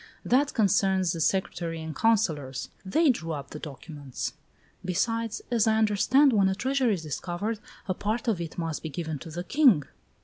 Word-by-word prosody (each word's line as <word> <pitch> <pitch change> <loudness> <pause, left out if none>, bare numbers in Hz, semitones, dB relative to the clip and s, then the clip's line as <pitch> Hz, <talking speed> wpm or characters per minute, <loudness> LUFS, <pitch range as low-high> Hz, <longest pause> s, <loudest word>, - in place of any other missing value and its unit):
"That 275 +4 +2
concerns 190 -4 +3
the 165 -2 -3
secretary 170 -2 -1
and 160 -1 -6
councillors. 160 - +1
They 285 - +3
drew 165 -9 -4
up 140 -2 -6
the 150 - -7
documents." 145 -2 -6 0.5
"Besides, 225 +5 -1
as 230 -3 +3
I 220 0 +3
understand, 220 +6 +4
when 200 -3 +4
a 190 - 0
treasure 260 +3 +1
is 190 -6 0
discovered, 175 +8 -3 0.3
a 185 - +1
part 215 +5 -2
of 205 -7 +1
it 165 -2 -6
must 165 -3 -3
be 160 - -5
given 155 0 -4
to 165 - -9
the 175 +3 -5
king." 250 - +4
190 Hz, 175 wpm, -27 LUFS, 160-225 Hz, 0.5 s, understand